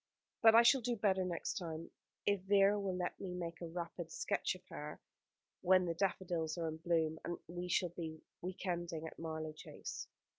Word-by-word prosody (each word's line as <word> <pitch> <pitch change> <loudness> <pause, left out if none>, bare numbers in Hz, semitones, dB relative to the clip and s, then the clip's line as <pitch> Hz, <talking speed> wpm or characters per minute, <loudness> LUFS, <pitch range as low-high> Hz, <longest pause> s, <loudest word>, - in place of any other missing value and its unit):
But 225 -1 +9
I 230 - +10
shall 260 +2 +6
do 240 +1 0
better 195 -3 +2
next 180 +3 -2
time, 165 -2 -5 0.3
if 200 -2 +3
Vera 200 +1 +5
will 195 -2 -1
let 180 -1 -2
me 180 -2 -4
make 170 -1 -4
a 170 - -3
rapid 170 0 -5
sketch 200 +1 0
of 185 0 -14
her, 150 +1 -6 0.6
when 185 0 +5
the 170 - 0
daffodils 175 -3 0
are 165 -1 -1
in 160 - -5
bloom, 160 -1 +1
and 175 - -3
we 175 +1 -4
shall 180 0 +2
be 160 -2 -6 0.2
week 185 +2 -5
ending 170 -3 -2
at 160 - -8
Marlow 160 -1 -3
Chase. 155 - -7
175 Hz, 190 wpm, -37 LUFS, 165-190 Hz, 0.6 s, I